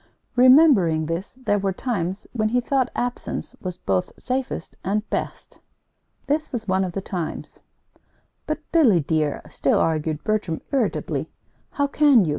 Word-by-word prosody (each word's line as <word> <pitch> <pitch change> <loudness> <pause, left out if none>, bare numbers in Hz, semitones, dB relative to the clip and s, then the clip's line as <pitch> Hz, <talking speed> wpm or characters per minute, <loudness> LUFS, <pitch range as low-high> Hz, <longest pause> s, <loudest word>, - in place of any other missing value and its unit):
Remembering 250 - +6
this, 165 +5 -4
there 255 -6 0
were 195 -1 0
times 190 -4 -3
when 215 -3 +1
he 245 +2 +2
thought 260 0 +1
absence 245 0 -3
was 180 -1 -4
both 95 - -1
safest 255 -8 -3
and 210 +3 -1
best. - - -4 0.7
This 305 +2 -1
was 230 -4 -4
one 190 0 +2
of 180 -2 -3
the 195 - -3
times. 180 -4 -5 0.9
"But, 310 - -1
Billy, 240 - +5
dear," 150 0 -1
still 140 - +1
argued 155 -1 0
Bertram, 210 -7 -1
irritably, 265 -6 -1 0.4
"how 285 - +1
can 280 -7 +5
you? - - -1
205 Hz, 145 wpm, -23 LUFS, 170-255 Hz, 0.9 s, Remembering